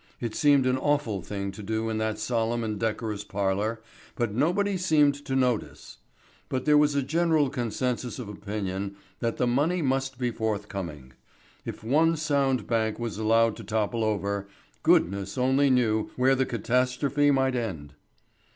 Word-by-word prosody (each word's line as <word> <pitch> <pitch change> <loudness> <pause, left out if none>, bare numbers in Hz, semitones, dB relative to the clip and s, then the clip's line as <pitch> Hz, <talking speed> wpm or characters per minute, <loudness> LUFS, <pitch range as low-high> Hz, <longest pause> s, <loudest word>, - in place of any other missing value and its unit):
It 115 -2 -3
seemed 145 -1 +4
an 130 0 +2
awful 145 -9 0
thing 100 +2 -4
to 95 - -10
do 110 +2 -2
in 110 -1 -2
that 110 0 -1
solemn 115 +1 -1
and 110 -2 -3
decorous 110 -1 -2
parlour, 100 +3 -1 0.3
but 115 -4 -1
nobody 180 - +1
seemed 155 -6 +3
to 135 - -2
notice. 125 -4 -1 0.5
But 130 0 -2
there 150 -1 +5
was 150 -1 +4
a 140 - +1
general 160 -1 +2
consensus 125 -1 -2
of 125 -5 -6
opinion 100 -1 -4 0.2
that 115 -1 -2
the - - +1
money 150 +8 +1
must 135 -1 -1
be 125 -1 -1
forthcoming. 100 - -4 0.5
If - - -7
one 160 +8 +3
sound 140 -5 +1
bank 110 -2 0
was 115 -3 -4
allowed 115 0 +3
to 115 - -8
topple 110 +2 -1
over, 100 -1 -1 0.3
goodness 100 +3 +2
only 130 +2 +3
knew 115 -4 +2
where 130 +1 +3
the 130 0 +1
catastrophe 125 +5 +1
might 135 -2 +2
end. 85 - -4
115 Hz, 160 wpm, -27 LUFS, 105-135 Hz, 0.5 s, there